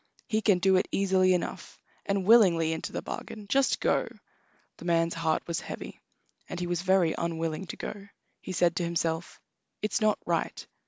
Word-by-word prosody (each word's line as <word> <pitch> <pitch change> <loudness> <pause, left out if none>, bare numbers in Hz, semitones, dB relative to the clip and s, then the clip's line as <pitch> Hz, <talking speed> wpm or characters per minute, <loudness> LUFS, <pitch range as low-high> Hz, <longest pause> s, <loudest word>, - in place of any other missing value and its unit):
"He 220 -1 0
can 205 -3 +4
do 190 +1 +4
it 185 - +1
easily 185 -1 +3
enough, 175 - -5 0.3
and 195 -2 0
willingly 180 -8 +5
into 160 - -5
the - - -4
bargain. 215 -2 -7
Just 270 +5 +2
go!" - - +1 0.7
The - - -11
man's 165 -1 +2
heart 165 -1 0
was 170 -1 -2
heavy, - - -8 0.5
and 180 - -5
he 175 - -2
was 175 -1 -1
very 185 -3 +3
unwilling 165 +1 -3
to - - -7
go. 200 -1 -7 0.3
He - - -7
said 175 -1 +2
to 175 - 0
himself: 170 0 -2 0.4
"It's 215 0 0
not 215 -1 +3
right." - - -2
180 Hz, 175 wpm, -28 LUFS, 165-195 Hz, 0.7 s, willingly